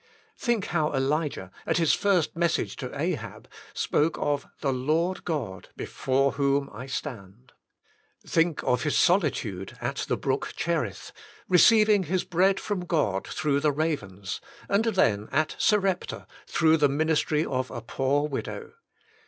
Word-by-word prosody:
Think 235 -5 0
how 155 -3 +1
Elijah, 135 - -1 0.2
at - - +2
his 165 -3 +3
first 185 -6 +1
message 170 0 0
to - - -5
Ahab, - - -3 0.3
spoke 155 +2 +1
of 145 -1 -1
" - - -40
the 135 -3 +1
Lord 160 +8 0
God, 120 - -4
before 135 +1 0
whom 140 0 0
I 125 +5 -8
stand.^' 120 -4 -7 0.8
Think 165 -1 +1
of 125 -1 +1
his 150 -1 +1
solitude 125 - +1
at - - -3
the - - 0
brook - - -2
Cherith, - - -2 0.4
receiving 210 +1 +5
his 180 +3 0
bread 190 +3 +2
from 195 -4 -3
God 100 - 0
through 145 -2 0
the 150 +1 +2
ravens, 105 - -3 0.3
and 200 +3 +2
then 110 - +2
at 155 +1 +1
Sarepta 195 -4 +1 0.2
through 160 -1 +3
the 145 -2 +3
ministry 155 +1 +1
of 130 -1 -2
a 120 - -5
poor 140 +5 0
widow. 140 - -5
150 Hz, 145 wpm, -27 LUFS, 130-175 Hz, 0.8 s, receiving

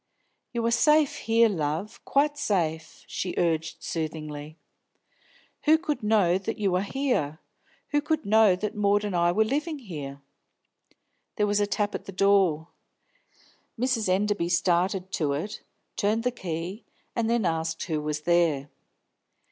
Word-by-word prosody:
"You 235 -2 -2
are 230 - +2
safe 300 +4 +4
here, 230 +1 +4
love, 165 0 -3
quite 290 +1 +2
safe!" 165 - -2
she 180 - -4
urged 165 -1 0
soothingly. 155 -1 -5 1.1
"Who 315 +1 +6
could 310 -3 -3
know 205 -4 +3
that 210 +4 -4
you 200 -3 0
are 180 - +2
here? 205 - -1 0.5
Who 290 -1 +2
could 315 0 -1
know 215 -2 +5
that 210 +3 -3
Maud 205 0 +2
and 200 -3 -2
I 175 0 +3
were 220 +5 +3
living 300 +6 -1
here?" 150 - -7 1.2
There 210 - +2
was 205 0 +1
a 205 - +2
tap 205 0 -1
at - - -5
the - - -7
door. 190 -5 +2 1.1
Mrs. 240 -5 +1
Enderby 195 -2 +1
started 180 +2 +1
to 150 -8 0
it, 205 +9 -4 0.3
turned 215 +3 +1
the 250 - +1
key, 180 -1 -5 0.3
and 230 -1 0
then 235 -3 +1
asked 165 -1 -1
who 155 -3 -2
was 150 0 -3
there. 160 -4 +2
195 Hz, 150 wpm, -27 LUFS, 165-225 Hz, 1.2 s, Who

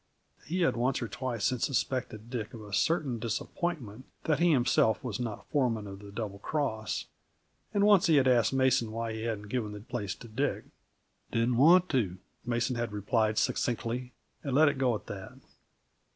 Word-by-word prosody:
He 180 +3 -1
had 170 - +3
once 125 +2 +1
or 120 - -3
twice 120 -2 -3
since 130 -3 0
suspected 120 -4 -2
Dick 115 -3 -4
of 110 - -9
a 105 -1 -10
certain 145 - +1
disappointment 120 +1 -3 0.2
that 155 -2 +1
he 175 0 +4
himself 120 -4 +3
was 120 -4 -3
not 115 -4 -5
foreman 120 -7 +1
of 95 -1 -8
the 100 0 -11
Double 100 -1 -5
Cross, 110 -5 -2 0.7
and 200 - +2
once 205 -4 +6
he 160 - +5
had 135 -2 +4
asked 120 -3 +4
Mason 130 -4 +2
why 115 0 -3
he 110 - -5
hadn't 110 -3 -3
given 110 -3 -2
the 105 - -7
place 105 -3 -4
to - - -12
Dick. 130 +6 -1 0.7
"Didn't 115 +1 +1
want 175 +7 +6
to," 105 -10 0 0.3
Mason 120 +1 -1
had 120 -2 -2
replied 110 +1 +1
succinctly, 125 +1 -1 0.3
and 135 -3 -2
let 155 +1 +6
it 140 - -4
go 125 -3 +2
at - - -7
that. 95 -2 -8
120 Hz, 180 wpm, -30 LUFS, 110-135 Hz, 0.7 s, once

